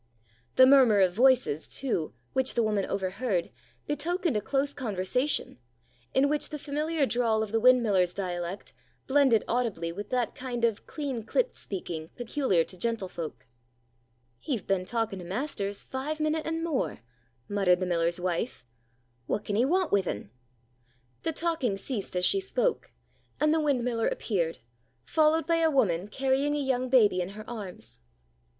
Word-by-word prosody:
The 260 - +8
murmur 255 -6 +6
of 185 -2 +4
voices, 245 - +3
too, 200 - -2 0.2
which 265 0 +1
the 235 - +3
woman 210 -3 0
overheard, 190 -1 -1 0.3
betokened 325 - -1
a 210 - +1
close 275 +4 0
conversation, 235 - -1 0.5
in 270 +2 +3
which 295 +1 -1
the 300 - -5
familiar 300 +1 -1
drawl 230 -4 +1
of 215 - -6
the 225 - +2
windmiller's 215 -8 +4
dialect 180 -1 -4 0.3
blended 265 -5 +4
audibly 220 -9 -1
with 205 +4 -7
that 250 -2 0
kind 245 -2 -2
of 225 -2 -2
clean 275 -7 -4
clipt - - 0
speaking 165 -5 -6
peculiar 240 - +1
to 185 - -9
gentlefolk. 185 -6 -4 0.9
"He've 245 - -3
been 190 -2 0
talking 225 -3 -2
to 175 - -8
master's 200 - -3
five 290 +4 -4
minute 310 +1 0
an' 325 0 -2
more," 310 - -2 0.5
muttered 195 -3 +3
the 185 - -1
miller's 170 0 +1
wife. 180 - -2 0.6
"What 210 - -2
can 205 - -2
'ee 235 +4 +3
want 360 +4 +1
with 195 -3 +2
un?" 100 0 -4 0.9
The 325 - -1
talking 315 -10 -1
ceased 200 -2 -3
as 180 0 +3
she 395 - +4
spoke, - - -1 0.5
and 305 0 +3
the 320 - +2
windmiller 250 -6 +1
appeared, 170 - -1 0.5
followed 315 +1 +3
by 335 -1 +2
a 325 -1 +3
woman 200 - +1
carrying 270 +5 0
a - - -1
young 255 -2 0
baby 210 -8 +4
in 175 - -3
her 215 - -9
arms. 210 -6 -8
235 Hz, 155 wpm, -28 LUFS, 190-280 Hz, 0.9 s, The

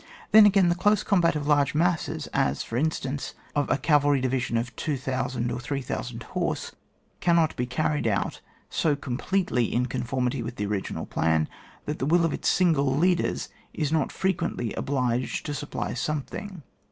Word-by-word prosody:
Then 215 -1 +9
again, 195 -3 +4
the - - +4
dose 205 +3 +2
combat 175 -6 +3
of 150 -1 -2
large 145 -1 +3
masses, 170 +1 0
as, 65 +1 +1
for 115 - -6
in 150 +6 +3
stance,'of 145 0 -4
a - - +3
cavalry 145 -2 +3
division 125 -2 0
of 115 0 -3
2,000 130 -4 -2
or 120 - -3
3,000 135 +1 -4
horse, - - -2 0.5
cannot 170 -2 +3
be 125 - -2
carried 150 0 0
out 100 -3 -1 0.3
so 150 -3 +1
com 130 -3 -4
pletely 175 - 0
in 125 +1 +1
conformity 125 +1 -1
with 115 +1 -5
the 105 - -2
original 100 -1 -3
plan 80 -1 +1 0.4
that 150 - -3
the 135 - -1
will 170 +2 +4
of 165 - 0
its - - 0
single 140 -7 +3
leaders 175 +2 +1 0.3
is 150 -2 -1
not 160 -3 +1
frequently 170 - -1
obliged 125 -3 -1
to 145 - -3
supply 140 - -4
some 150 +3 -1
thing. 190 -3 -8
140 Hz, 170 wpm, -26 LUFS, 125-165 Hz, 0.5 s, Then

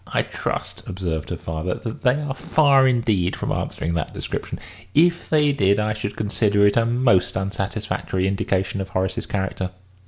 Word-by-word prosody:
"I - - 0
trust," - - -4
observed 85 -4 -3
her - - -3
father, 80 +3 -3
"that 115 - -6
they 130 +1 +3
are 145 -3 -3
far 135 -1 +4
indeed 110 -8 +1
from - - -3
answering 85 - -2
that 85 -2 -3
description. - - -4 0.4
If 170 +3 +3
they 150 -2 +4
did, 100 -6 +2
I 105 0 0
should 105 -1 -5
consider 105 -1 +2
it 100 - +4
a 115 -1 +3
most 120 -7 +3
unsatisfactory 95 -1 -2
indication 95 0 -1
of 95 - -5
Horace's 95 0 -1
character." 95 -2 -2
100 Hz, 165 wpm, -22 LUFS, 95-125 Hz, 0.4 s, far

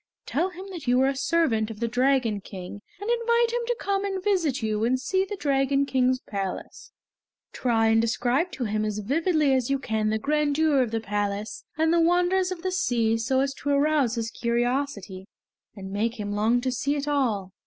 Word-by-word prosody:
Tell 340 +6 0
him 370 +1 -10
that 340 -7 -8
you 250 +1 +4
are 265 - +4
a 275 - -2
servant 265 -8 +1
of 220 -2 -8
the 235 - 0
Dragon 250 -3 +1
King, 190 +1 -9 0.2
and 405 - -6
invite 470 0 +2
him 485 - 0
to 485 - +1
come 395 0 -1
and 385 -2 -3
visit 330 - +1
you 215 0 0
and 255 +3 +2
see 375 +8 0
the 410 - -5
Dragon 275 -4 +1
King's 255 -1 +1
palace. 195 -2 -6 0.6
Try 225 -3 +2
and 225 0 +4
describe 245 +9 0
to 260 - -3
him 215 -1 -1
as 210 -1 -2
vividly 300 - +1
as 255 -2 +1
you 275 - +2
can 220 -5 -1
the 220 - +1
grandeur 295 +2 +2
of 245 - 0
the 225 0 -2
palace 205 0 -3
and 320 +1 +2
the 340 - +4
wonders 360 +2 +2
of 355 -2 -6
the 375 - -1
sea 240 -11 +1
so 260 +4 +1
as 275 0 0
to 285 - -5
arouse 285 -4 +2
his 230 -1 -3
curiosity 235 -6 -2 0.5
and 190 -2 -8
make 225 +4 -1
him 205 -1 -3
long 220 +4 +2
to 255 0 -1
see 280 +4 -1
it 290 0 -3
all!" 230 -10 0
260 Hz, 205 wpm, -26 LUFS, 225-315 Hz, 0.6 s, you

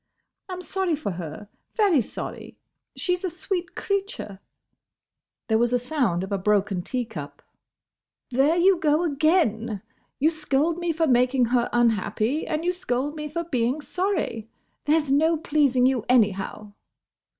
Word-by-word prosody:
I - - -4
'm 365 0 -6
sorry 375 -3 0
for 290 -9 -4
her, 170 +2 -7 0.3
very 395 - +4
sorry. - - -7 0.4
She's 360 -1 -1
a 370 - 0
sweet 360 +1 -4
creature." 395 - -3 1.1
There 220 -1 +2
was 240 0 +2
a - - +5
sound 245 - 0
of 195 - -6
a 200 - 0
broken 200 -1 +1
tea 245 +7 -3
cup. 150 -11 -9 0.9
"There 275 +6 +3
you 360 +1 +4
go 305 +1 +2
again!—You 275 - 0
scold 310 +1 0
me 345 -1 0
for 325 0 +1
making 250 -1 +3
her 240 -1 +2
unhappy, 235 +3 +1
and 310 +1 -2
you 360 - +2
scold 285 -3 -2
me 300 -1 -5
for 335 +3 -3
being 255 -3 0
sorry. 350 - -2 0.4
There 310 +2 +4
's 295 -3 -3
no 320 +4 +3
pleasing 290 -5 +2
you 255 -4 +2
anyhow!" 210 -3 +1
275 Hz, 150 wpm, -25 LUFS, 225-330 Hz, 1.1 s, a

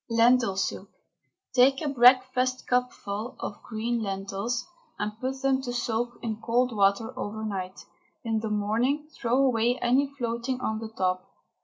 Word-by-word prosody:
LENTIL 230 -3 +4
SOUP. 190 - -2 0.7
Take 265 +2 +5
a - - -4
breakfastcupful 250 -3 +2
of 205 - -6
green 230 +1 -2
lentils 200 +4 -3 0.3
and 210 0 -2
put 265 +2 -4
them 270 -1 +2
to 250 -2 -4
soak 240 0 -2
in 220 -1 -3
cold 240 +1 +1
water 200 +2 +2
overnight. 205 -3 -5 0.4
In 225 -2 0
the 220 0 -3
morning 230 +9 0
throw 240 +1 0
away 245 -2 +3
any 260 +4 +3
floating 240 0 -2
on 220 -3 -2
the 225 -1 -6
top. 185 -4 -1
235 Hz, 140 wpm, -27 LUFS, 215-255 Hz, 0.7 s, Take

